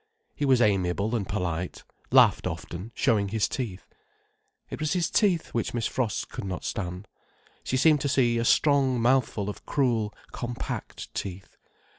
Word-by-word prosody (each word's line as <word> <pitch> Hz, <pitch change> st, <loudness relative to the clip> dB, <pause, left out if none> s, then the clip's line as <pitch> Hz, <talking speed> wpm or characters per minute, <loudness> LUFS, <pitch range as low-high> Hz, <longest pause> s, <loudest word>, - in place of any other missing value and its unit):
He 145 Hz, -, -2 dB
was 130 Hz, -3 st, +4 dB
amiable 100 Hz, +2 st, +1 dB
and 100 Hz, -5 st, -2 dB
polite, 90 Hz, -3 st, -3 dB, 0.3 s
laughed -, -, +5 dB
often, 90 Hz, +7 st, -6 dB
showing 105 Hz, -3 st, +2 dB
his 105 Hz, +1 st, +1 dB
teeth. 105 Hz, -8 st, -5 dB, 0.8 s
It -, -, -5 dB
was 155 Hz, -1 st, 0 dB
his 175 Hz, -3 st, 0 dB
teeth 190 Hz, -6 st, +2 dB
which 115 Hz, 0 st, -2 dB
Miss 115 Hz, -2 st, -1 dB
Frost 120 Hz, -5 st, -1 dB
could -, -, -6 dB
not 95 Hz, -2 st, -4 dB
stand. 90 Hz, -1 st, -4 dB, 0.6 s
She 130 Hz, -, -1 dB
seemed 150 Hz, +1 st, +4 dB
to 140 Hz, -, 0 dB
see 120 Hz, -3 st, +2 dB
a -, -, 0 dB
strong 135 Hz, 0 st, +3 dB
mouthful 120 Hz, -4 st, +2 dB
of 105 Hz, -, -6 dB
cruel, 120 Hz, -7 st, +1 dB, 0.2 s
compact 120 Hz, -1 st, -5 dB
teeth. 95 Hz, -1 st, -6 dB
115 Hz, 155 wpm, -27 LUFS, 100-130 Hz, 0.8 s, laughed